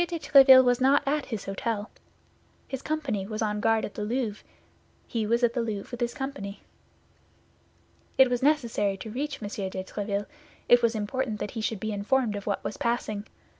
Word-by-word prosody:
de 340 - -3
Tréville 270 -4 +8
was 245 0 +2
not 275 +2 +4
at 290 +1 0
his 220 -5 -5
hôtel. 205 +2 -2 0.8
His 265 -1 -5
company 275 -12 -2
was 215 +1 -3
on 210 -1 -1
guard 225 +1 +2
at - - -8
the 210 - -4
Louvre; 225 -1 -2 0.7
he 225 -3 -2
was 235 +2 +1
at 235 -1 +3
the 245 - 0
Louvre 215 -3 -4
with 245 0 -6
his 240 0 -1
company. 270 -8 -6 1.5
It 265 - +7
was 245 -1 -1
necessary 235 -9 +1
to 220 +3 -8
reach 275 0 -4
M. - - -3 0.2
de 185 0 -5
Tréville; 200 +1 -3 0.4
it 245 0 +6
was 235 -1 +2
important 220 +1 -2
that - - -4
he 225 - -4
should 215 -1 -2
be 220 +2 -3
informed 215 +2 0
of 200 0 -7
what 200 - -1
was - - -4
passing. 215 -3 -2
230 Hz, 190 wpm, -27 LUFS, 210-260 Hz, 1.5 s, Tréville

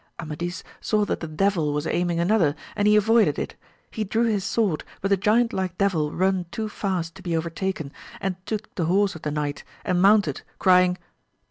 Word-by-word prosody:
Amadis 170 +3 -5 0.2
saw 210 -1 +1
that - - -2
the 165 - -5
devil 160 -2 +1
was 150 +1 -2
aiming 175 0 0
another 170 -5 +3 0.2
and 205 - +2
he 210 - +6
avoided 220 +2 +4
it; - - -4 0.4
he 220 - -2
drew 220 +3 0
his 215 -4 +1
sword 200 -9 0 0.2
but 195 - -1
the 200 - +5
giant 220 +5 +2
like 185 -2 -2
deAdl 175 -7 +1
run 185 0 0
too 220 +2 -3
fast 185 -5 -2
to 190 - -13
be 170 -3 -1
overtaken, 165 -2 -3 0.3
and 190 -2 -2
took 215 -1 -4
the 170 - -1
horse 195 +4 +2
of 160 - -10
the 150 - -2
knight 145 -1 -3 0.2
and 180 -1 +1
mounted, 195 -7 +4 0.2
crying. 180 -1 +4
185 Hz, 195 wpm, -24 LUFS, 165-205 Hz, 0.4 s, he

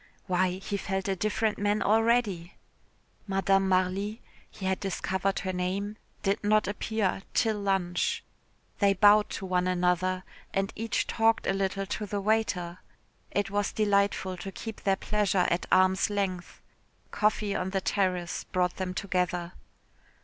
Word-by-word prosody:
Why, 185 0 +1
he 195 +2 -4
felt 195 0 -2
a 195 - +1
different 215 +3 0
man 205 +1 +1
already. 220 -5 +2 0.7
Madame 195 0 +2
Marly 190 +4 0 0.3
he 190 - -8
had 190 0 0
discovered 190 0 -1
her 190 -1 -3
name 190 +3 -2 0.3
did 200 +2 0
not 215 -1 +3
appear 205 -1 -1
till 220 -3 +2
lunch. 190 -3 0 0.6
They 200 -1 +4
bowed 210 +2 +6
to 195 - -5
one 180 -1 +1
another, 185 +1 +1 0.3
and 195 0 0
each 225 0 -1
talked 225 0 +2
a - - +2
little 195 0 -1
to 210 +2 -4
the 205 +1 -2
waiter. 195 -4 0 0.5
It 205 -1 -1
was 205 0 0
delightful 200 -3 +1
to 195 +2 -6
keep 220 +3 -7
their 195 -1 +2
pleasure 200 -3 +1
at 170 - 0
arm's 185 +1 +4
length. 195 -3 -3 0.5
Coffee 210 -1 +1
on 185 - -1
the 195 0 0
terrace 185 -3 -1
brought 180 -1 0
them 185 -1 -3
together. 180 -3 -1
195 Hz, 145 wpm, -28 LUFS, 185-205 Hz, 0.7 s, bowed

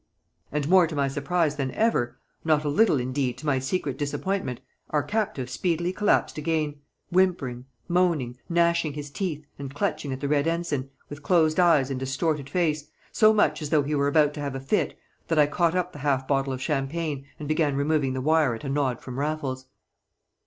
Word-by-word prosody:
And 145 -1 -1
more 180 0 +6
to 160 - -6
my 140 -1 +1
surprise 150 +2 0
than 135 -2 -1
ever, 130 - +1 0.3
not 155 -2 +2
a 150 - -1
little 150 -1 +3
indeed 125 0 -1
to 150 - -10
my 140 -3 +2
secret 135 0 -2
disappointment, 145 -2 -2 0.3
our 150 -1 +1
captive 205 - -2
speedily 170 +6 -1
collapsed 205 -5 +1
again, 150 -2 -1 0.3
whimpering, 170 -10 +1 0.2
moaning, 170 -9 +1
gnashing 170 -2 +2
his 145 -1 -7
teeth, 155 -3 -3
and 140 -1 -6
clutching 145 -1 -1
at 130 - -4
the 140 - -2
Red 145 +1 +2
Ensign, 165 -5 -1 0.2
with 145 0 -9
closed 160 -1 +3
eyes 155 -7 +4
and 130 - -2
distorted 135 +2 -1
face, 155 -4 0 0.2
so 215 -1 +5
much 160 -9 +2
as 150 - -4
though 150 -2 +3
he 145 +2 -2
were 140 -1 +2
about 150 0 +3
to 150 - -7
have 140 -2 -3
a - - -3
fit 135 +10 -1 0.3
that 165 - 0
I 150 - +7
caught 170 +3 +1
up 180 0 0
the 145 - -9
half 135 -2 0
bottle 135 -1 +1
of 130 0 -4
champagne, 145 0 -2
and 150 - -7
began 155 -2 +1
removing 140 -1 +1
the 130 - -2
wire 155 -3 +3
at 115 - -10
a 140 - -4
nod 135 -4 0
from 125 0 -6
Raffles. 140 -3 -3
150 Hz, 195 wpm, -26 LUFS, 135-165 Hz, 0.3 s, I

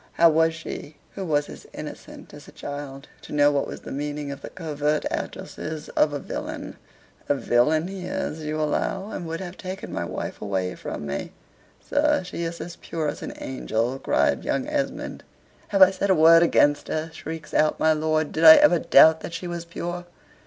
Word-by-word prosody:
How 170 -1 +6
was 160 +1 +3
she, 155 -2 -7 0.2
who 195 - -5
was 150 -4 0
as - - -11
innocent - - -9
as - - -12
a - - -12
child, 140 -1 -7
to - - -13
know 145 0 +4
what 140 -1 0
was - - -8
the - - -9
meaning 145 0 -4
of 140 - -8
the - - -7
covert 150 -3 -2
addresses 155 -1 -5
of 150 - +2
a 145 - -2
villain?" - - -6 0.5
"A 145 - +4
villain 140 +6 +2
he 190 -1 -6
is, 155 - -3
you 155 +1 -3
allow, 190 +6 -1
and 175 - -5
would 165 +1 -4
have 180 0 -7
taken 185 +1 -7
my - - -2
wife 85 - -5
away 95 -2 -2
from 75 - -6
me." 70 0 -4 0.5
"Sir, 295 -4 +2
she 180 - -6
is 170 0 -4
as 175 0 -7
pure 160 -3 -3
as 145 - -6
an - - -6
angel," 125 0 -2
cried - - +1
young 265 - -1
Esmond. 295 -2 -3 0.4
"Have 195 -2 +6
I 190 - +7
said 195 +1 -2
a 190 - +5
word 165 +1 +7
against 145 -3 +3
her?" 155 +1 -3
shrieks 160 -2 -8
out 155 0 +2
my 160 0 +4
lord. 155 0 0
"Did 160 - -2
I 160 -1 +12
ever 175 - +5
doubt 160 0 +6
that 170 - -7
she - - -5
was 170 -1 -5
pure? 175 +1 -5
160 Hz, 200 wpm, -24 LUFS, 145-170 Hz, 0.5 s, I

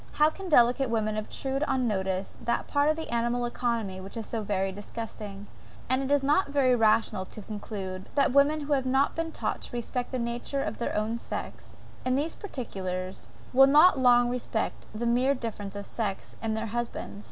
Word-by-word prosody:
How 300 +1 +4
can 385 +2 -7
DELICATE 250 -2 +5
women 215 -2 0
obtrude 265 +5 -3
on 255 -5 +1
notice 190 -2 -1
that 235 - 0
part 285 +1 +2
of 310 - +3
the 320 -6 -5
animal 240 +1 +1
economy, 230 -6 -2
which 195 +4 -8
is 225 - -4
so 225 - -3
very 195 -2 0
disgusting? 205 0 -7 0.5
And 265 +1 +1
is 285 -1 +3
it - - -1
not 295 +4 +3
very 275 -3 +3
rational 220 -4 +3
to 215 - -9
conclude, 195 -3 -6
that 280 -2 +4
the - - -6
women 295 +2 +5
who 290 0 0
have 265 -2 +1
not 265 +2 +2
been 330 0 -2
taught - - -3
to - - -5
respect 240 +1 -3
the 260 - -1
human 235 -1 -1
nature 275 +3 -3
of 210 - -4
their 235 - -2
own 220 +2 -1
sex, - - -6 0.3
in 255 0 +1
these 300 +4 0
particulars, 190 - -5 0.3
will 270 +1 +8
not 295 +2 +7
long 245 -1 +5
respect 240 -2 -3
the 235 +2 -2
mere 250 +4 +3
difference 205 -5 -5
of 200 0 -5
sex, 205 -4 -4
in 220 -1 -1
their 220 +1 -2
husbands? 240 -3 -4
240 Hz, 200 wpm, -28 LUFS, 215-270 Hz, 0.5 s, will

